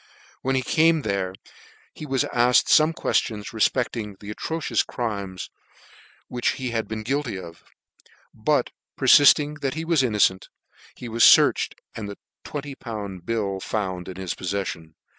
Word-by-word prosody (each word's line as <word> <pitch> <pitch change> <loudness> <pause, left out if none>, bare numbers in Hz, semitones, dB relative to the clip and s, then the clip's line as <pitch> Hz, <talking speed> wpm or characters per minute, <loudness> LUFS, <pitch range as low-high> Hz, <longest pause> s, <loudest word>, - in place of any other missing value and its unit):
When 135 +1 0
he 130 - 0
came 160 +2 +3
there 95 -3 -2 0.6
he 155 - -9
was 135 -2 +1
alked 120 0 +3
fome 155 +1 +5
queftions 110 -9 -1
refpecling 110 -2 -1
the 105 +1 -8
atro 165 +9 -4
cious - - +1
crimes 100 -6 -5 0.7
of - - -58
which 120 -1 -1
he 130 -3 -4
had 115 -1 -2
been 110 0 -5
guilty; 130 -4 -2 0.9
but - - 0 0.3
perilling 150 +1 +5
that 135 -1 -2
he 160 +1 -4
was 165 -4 +3
innocent, 105 -6 +1 0.5
he 125 - -8
was 115 0 -3
fearched, - - +6 0.2
and 105 -2 -6
the 100 - -8 0.3
201. 115 -9 -6
bill 100 0 -2
found 95 -4 -3
in 90 - -8
his 95 -2 -3
poffeffion. 90 -4 -4
115 Hz, 145 wpm, -24 LUFS, 100-135 Hz, 0.9 s, fearched